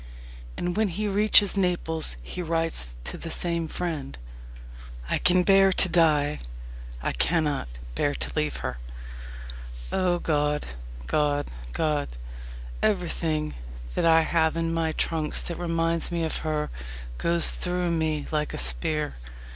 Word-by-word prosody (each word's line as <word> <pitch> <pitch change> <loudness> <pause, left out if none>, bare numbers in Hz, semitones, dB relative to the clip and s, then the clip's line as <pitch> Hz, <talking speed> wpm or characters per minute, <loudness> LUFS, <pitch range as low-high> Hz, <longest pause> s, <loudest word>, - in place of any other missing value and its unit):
And 175 0 -2
when 215 0 +2
he 205 +4 -2
reaches 205 0 +4
Naples 175 - 0
he 180 - -5
writes 165 - 0
to - - -4
the 165 - -5
same 170 0 -1
friend: 155 -5 -4 0.9
I - - +2
can 180 0 +4
bear 195 0 +6
to 185 - +3
die 150 -4 +3 0.6
I - - 0
cannot 150 - +1 0.3
bear 70 +3 0
to - - -4
leave 75 -5 0
her. - - -4 1.1
O 180 -1 +2
God! 150 -3 0 0.4
God! 145 - 0 0.2
God! 150 -2 0 0.7
Everything 165 -6 0 0.4
that - - 0
I 165 0 +6
have 160 0 +1
in 165 0 0
my 165 -1 0
trunks 155 -2 +1
that 170 - -5
reminds 165 -1 0
me 170 -1 -1
of 160 - -2
her 155 -1 -2 0.5
goes 170 -1 +3
through 180 -1 -1
me 155 -3 0
like 150 -1 -1
a - - -4
spear. 65 - +3
165 Hz, 135 wpm, -26 LUFS, 150-175 Hz, 1.1 s, bear